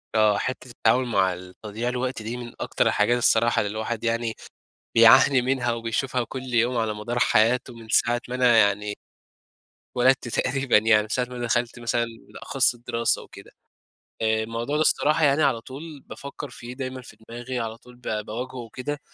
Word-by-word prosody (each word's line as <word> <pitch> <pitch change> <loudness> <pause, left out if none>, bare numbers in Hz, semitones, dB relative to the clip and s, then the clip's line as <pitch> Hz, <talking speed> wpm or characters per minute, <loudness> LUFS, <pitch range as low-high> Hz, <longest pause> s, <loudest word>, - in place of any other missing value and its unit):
آه، 105 -2 +4
حتّة 130 +2 -4
التعامل 125 +1 +2
مع 95 -5 +2
ال 90 +1 -11
تضييع 110 +3 -3
الوقت 125 -1 -3
دي 115 +3 -5
من 120 -1 -8
أكتر - - 0
الحاجات 120 +4 +2
الصراحة 115 -1 +3
اللي 105 - -2
الواحد 110 +1 -4
يعني 115 0 -1 0.6
بيعاني 125 +3 +7
منها، 125 -2 0
وبيشوفها 115 +2 -2
كل 130 -1 -6
يوم 120 +2 +2
على 110 -2 0
مدار 120 +3 -4
حياته 120 +2 +2
من 115 -1 -13
ساعة 120 +1 +2
ما 125 - -5
أنا 125 -2 +4
يعني 105 -1 +2 1.0
اتولدت 130 +1 +3
تقريبًا 130 0 +1
يعني 110 0 +4
من - - -9
ساعة 125 +2 0
ما 125 0 -10
أنا 120 -1 -3
دخلت 120 +1 -1
مثلًا 120 0 0 0.2
بالأخص 135 -2 0
الدراسة 115 -1 -1
و - - -16
كده. - - -14 0.7
آآ، 110 0 +1
الموضوع 115 +5 -3
ده 150 - +1
الصراحة 155 0 +3
يعني 145 +2 +3
على 125 -5 +2
طول 145 +4 -10
بافكَّر 140 +1 -8
فيه، 120 0 -9
دايمًا 130 0 -6
في 110 -3 -14
دماغي، 120 +2 -5
على 115 0 -4
طول 125 +1 -17
با 110 -3 -4
باواجهُه 125 +5 -6
وكده، 125 +5 -5
120 Hz, 180 wpm, -24 LUFS, 115-130 Hz, 1.0 s, بيعاني